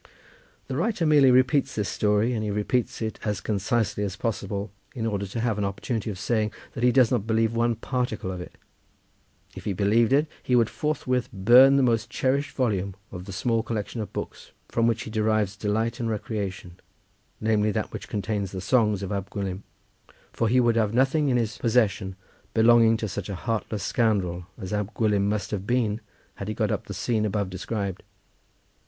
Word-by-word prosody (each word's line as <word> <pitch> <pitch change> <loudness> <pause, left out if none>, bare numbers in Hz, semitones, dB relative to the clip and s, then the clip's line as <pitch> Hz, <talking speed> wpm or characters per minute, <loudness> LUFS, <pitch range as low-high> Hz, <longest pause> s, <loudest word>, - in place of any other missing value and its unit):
The - - -4
writer 210 -7 0
merely 145 -3 +6
repeats 130 +2 +3
this 105 -2 -1
story, 105 +3 +1
and 110 -2 -2
he 105 - -2
repeats 105 +4 -1
it 110 - -4
as 105 -3 -1
concisely 105 0 0
as 100 -2 -3
possible, 100 -2 -3 0.2
in 115 -3 -2
order 100 -3 -1
to 110 +5 -5
have 115 -3 0
an - - 0
opportunity 100 +3 -2
of 100 - -5
saying 105 +2 0 0.2
that 115 - -4
he 125 - +5
does 125 -2 +4
not 115 -4 0
believe 110 0 +2
one 115 0 +1
particle 125 -6 -2
of 90 -1 -5
it. - - -11 1.0
If - - -9
he 100 - 0
believed 105 +5 +3
it 145 +3 +4 0.2
he 125 - +1
would 115 -2 +3
forthwith 130 -5 -1
burn 120 +7 +7
the 140 - +4
most 115 -2 +1
cherished 130 +3 0
volume 100 -7 0 0.2
of 90 -1 -7
the 100 - -7
small 115 +4 0
collection 115 0 -4
of 105 - -6
books - - -7 0.2
from 115 0 +2
which 115 - 0
he 110 - -8
derives 110 -2 +1
delight 110 +3 -1
and 115 -1 -1
recreation, 100 -4 -4 0.6
namely, 110 -1 +2
that 105 - -2
which - - -7
contains 100 -2 -2
the 95 - -3
songs 105 0 +2
of 95 - -4
Ab 100 -1 -3
Gwilym, 95 -2 -4 0.7
for 115 - 0
he 125 +2 +4
would 120 -2 +3
have 110 -1 +1
nothing 135 +3 +3
in 125 - +3
his 115 -2 -2
possession 110 -5 +1 0.4
belonging 115 0 +6
to 110 - -3
such 100 0 -5
a 100 - -3
heartless 110 0 -3
scoundrel 95 -7 0
as 95 +1 -6
Ab 105 +1 -2
Gwilym 105 -3 +2
must 105 0 -2
have 100 -1 -3
been 115 -3 +1 0.4
had 100 - -5
he 110 - -3
got 110 -2 0
up - - -2
the 100 - -5
scene 110 +2 0
above 100 -2 -1
described. 95 0 -3
110 Hz, 195 wpm, -26 LUFS, 100-120 Hz, 1.0 s, burn